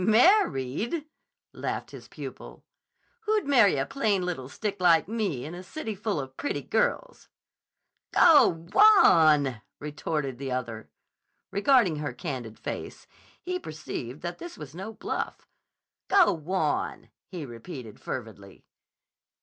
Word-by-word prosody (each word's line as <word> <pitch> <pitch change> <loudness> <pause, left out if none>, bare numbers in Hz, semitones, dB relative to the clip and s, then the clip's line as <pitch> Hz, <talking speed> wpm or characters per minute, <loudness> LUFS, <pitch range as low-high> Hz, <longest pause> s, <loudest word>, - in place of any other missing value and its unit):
"Married!" 225 - +3 0.5
laughed - - -4
his - - -11
pupil. - - -10 0.6
"Who'd 430 -1 +2
marry 240 - +5
a 135 - 0
plain 210 -9 0
little 135 -8 -4
stick 205 +3 -4
like 170 -2 +5
me 200 - -2
in 155 - -7
a 175 - -7
city 220 +3 -5
full 205 -4 -2
of 130 -1 -7
pretty 285 - -3
girls?" - - -1 0.8
"Go 325 -4 +7 0.3
wan!" 155 - +6 0.2
retorted 150 -3 -4
the 135 -1 -4
other. 115 -3 -5 0.6
Regarding 205 - +3
her 150 -1 -4
candid 125 -10 -6
face, - - -6 0.4
he 365 0 -2
perceived 150 - -7
that 175 0 -5
this 345 - -8
was 150 -3 -9
no 190 +6 -6
bluff. - - -5 0.6
"Go 385 - +5
wan!" 160 -1 -2 0.2
he 175 -5 -6
repeated 120 - -9
fervidly. - - -8
175 Hz, 125 wpm, -27 LUFS, 140-230 Hz, 0.8 s, Go